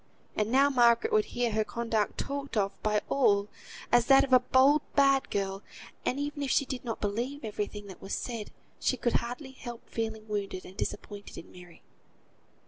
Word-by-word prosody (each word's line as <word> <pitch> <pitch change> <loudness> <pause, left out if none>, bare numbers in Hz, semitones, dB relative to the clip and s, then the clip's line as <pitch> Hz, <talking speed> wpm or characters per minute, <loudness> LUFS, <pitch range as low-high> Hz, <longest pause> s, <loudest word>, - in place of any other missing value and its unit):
And 215 +1 0
now 275 +2 +5
Margaret 245 - +4
would 430 -1 +4
hear 240 -1 -1
her 215 0 +1
conduct 225 -2 -1
talked 280 -3 -4
of 200 -1 -1
by 210 -1 +1
all, 205 -7 +2 0.4
as 240 -1 +4
that 270 -1 +7
of 265 - -1
a 255 - +9
bold, 265 +4 +4
bad 275 -1 +4
girl; 195 -1 -2 0.4
and 265 - -1
even 290 0 -3
if 280 - -1
she 280 - +3
did 260 -1 -5
not 230 -3 -4
believe 240 +6 -3
every 210 -1 -2
thing 205 -1 -9
that 190 -2 -11
was 195 - -3
said, 230 -4 -5 0.3
she 260 - +1
could 240 - 0
hardly 250 +4 -2
help 240 -3 -9
feeling 220 -1 -4
wounded, 200 -3 -3
and 185 - -12
disappointed 205 0 -6
in - - -10
Mary. 175 -2 -15
235 Hz, 190 wpm, -29 LUFS, 210-270 Hz, 0.4 s, a